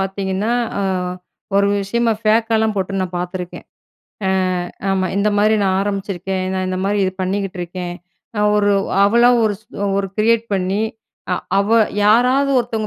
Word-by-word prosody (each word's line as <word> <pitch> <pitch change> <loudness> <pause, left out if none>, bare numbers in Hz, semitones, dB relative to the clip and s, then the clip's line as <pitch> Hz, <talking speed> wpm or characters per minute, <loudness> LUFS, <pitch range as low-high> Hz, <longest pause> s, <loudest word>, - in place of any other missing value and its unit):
பார்த்தீங்கன்னா, 195 +3 -1 0.3
அ - - 0 0.7
ஒரு 200 0 +4 0.2
விஷயமா, 230 +3 +1
ஃபேக்காலாம் 220 0 +2
போட்டு 195 0 -1
நான் 180 -1 -4
பார்த்துருக்கேன். 180 0 -5 0.6
அ - - +2 0.6
ஆமா. 190 -1 +1
இந்த 200 +1 +2
மாதிரி 215 +1 +4
நான் 190 -1 +2
ஆரம்பிச்சிருக்கேன். 195 -2 -3
நான் 185 0 -1
இந்த 185 0 -2
மாதிரி 205 +1 +1
இது 185 - -1
பண்ணிக்கிட்டு 195 0 -2
இருக்கேன். 175 0 -5 0.4
நான் 210 0 +3
ஒரு, 205 -1 +3 0.3
அவளா 235 +4 +5
ஒரு, 210 -1 +1 0.4
ஒரு 195 -1 -2
கிரியேட் 230 +1 +3
பண்ணி 190 +2 0 0.5
அ - - +3 0.2
அவ 200 +1 +1 0.4
யாராவது 250 +6 +4
ஒருத்தங்க 225 -3 -2
200 Hz, 145 wpm, -19 LUFS, 190-220 Hz, 0.7 s, அவளா